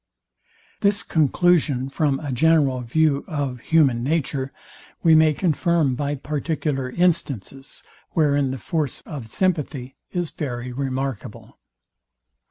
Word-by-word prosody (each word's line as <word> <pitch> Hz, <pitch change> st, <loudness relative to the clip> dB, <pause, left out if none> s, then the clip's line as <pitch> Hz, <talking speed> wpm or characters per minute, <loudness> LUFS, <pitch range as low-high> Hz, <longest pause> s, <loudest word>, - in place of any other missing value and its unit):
This 200 Hz, 0 st, +2 dB
conclusion 155 Hz, -3 st, +2 dB
from 135 Hz, 0 st, 0 dB
a 145 Hz, -3 st, -4 dB
general 140 Hz, -1 st, +3 dB
view 140 Hz, +3 st, +1 dB
of 140 Hz, -7 st, -3 dB
human 135 Hz, -4 st, +3 dB
nature, 135 Hz, -2 st, -1 dB, 0.5 s
we 165 Hz, -, +6 dB
may 155 Hz, 0 st, +6 dB
confirm 165 Hz, -2 st, +1 dB
by 145 Hz, +3 st, -2 dB
particular 145 Hz, -1 st, -2 dB
instances, 135 Hz, -, -1 dB, 0.3 s
wherein 145 Hz, -3 st, +2 dB
the 130 Hz, -, -3 dB
force 150 Hz, 0 st, -2 dB
of 140 Hz, -8 st, -8 dB
sympathy 145 Hz, -, -1 dB
is 175 Hz, -2 st, -2 dB
very 125 Hz, -4 st, -4 dB
remarkable. 135 Hz, -1 st, -4 dB
145 Hz, 110 wpm, -23 LUFS, 130-160 Hz, 0.5 s, we